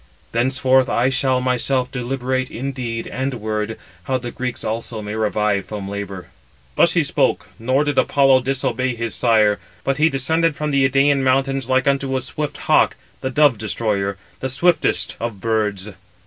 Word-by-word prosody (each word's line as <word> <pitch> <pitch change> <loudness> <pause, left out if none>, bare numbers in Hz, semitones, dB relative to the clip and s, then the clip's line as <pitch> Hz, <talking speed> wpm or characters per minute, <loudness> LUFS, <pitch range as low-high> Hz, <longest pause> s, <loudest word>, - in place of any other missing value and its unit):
Thenceforth 130 +2 +2
I 120 +3 +2
shall 130 -1 +1
myself 125 0 0
deliberate 130 0 -2
in 135 +4 -4
deed 120 -4 -4
and 130 +1 -3
word, 110 -1 -3 0.3
how 130 - 0
the 120 -1 -6
Greeks 125 -1 -4
also 115 +1 -3
may 105 0 -5
revive 105 -2 0
from 105 -2 -5
labour." 100 -2 -6 0.5
Thus - - +4
he - - +3
spoke, - - 0
nor 130 +5 +1
did 145 -2 +1
Apollo 135 -2 +4
disobey 130 -1 -1
his 115 -1 -3
sire, 110 -4 +3 0.2
but 135 +1 -1
he 160 +1 +5
descended 160 +4 +1
from 150 0 -2
the 135 -1 +3
Idæan 140 +1 +3
mountains 135 0 +1
like 130 +1 +2
unto 135 -1 +1
a - - -2
swift 145 +2 -4
hawk - - +4 0.2
the 130 - -3
dove 140 -4 +3
destroyer, 100 -3 -1 0.2
the 130 - -3
swiftest 170 +7 +1
of 115 -4 -4
birds. 105 -2 -1
130 Hz, 165 wpm, -20 LUFS, 110-135 Hz, 0.5 s, he